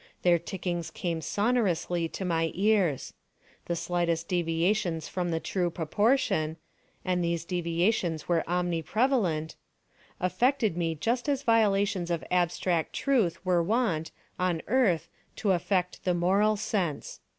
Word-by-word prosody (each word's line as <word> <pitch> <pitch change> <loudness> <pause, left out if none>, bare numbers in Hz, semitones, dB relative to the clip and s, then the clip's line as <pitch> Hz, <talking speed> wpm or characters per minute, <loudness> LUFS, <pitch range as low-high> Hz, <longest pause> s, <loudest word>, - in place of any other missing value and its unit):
Their 175 -1 +4
tickings 175 -1 -4
came 170 -2 -3
sonorously 190 -5 0
to 190 - -5
my 165 -2 +1
ears. 195 -7 +1 0.5
The 170 - -1
slightest 170 -1 -1
deviations 170 0 0
from 180 -2 -2
the 165 -1 0
true 180 +1 -1
proportion—and 180 - -1
these 170 -1 -1
deviations 170 -1 0
were 170 -2 +2
omni 175 -1 0
prevalent—affected 215 - -1
me 165 -2 -1
just 235 - -1
as 280 -1 0
violations 200 -6 +2
of 170 -2 -1
abstract 175 -1 +1
truth 235 - 0
were 180 -2 +3
wont, 180 -5 0 0.3
on 180 -3 0
earth, 200 -10 +2 0.3
to 205 - 0
affect 180 0 0
the 180 -1 +1
moral 195 +5 +3
sense. 185 -7 -2
180 Hz, 120 wpm, -28 LUFS, 170-205 Hz, 0.5 s, Their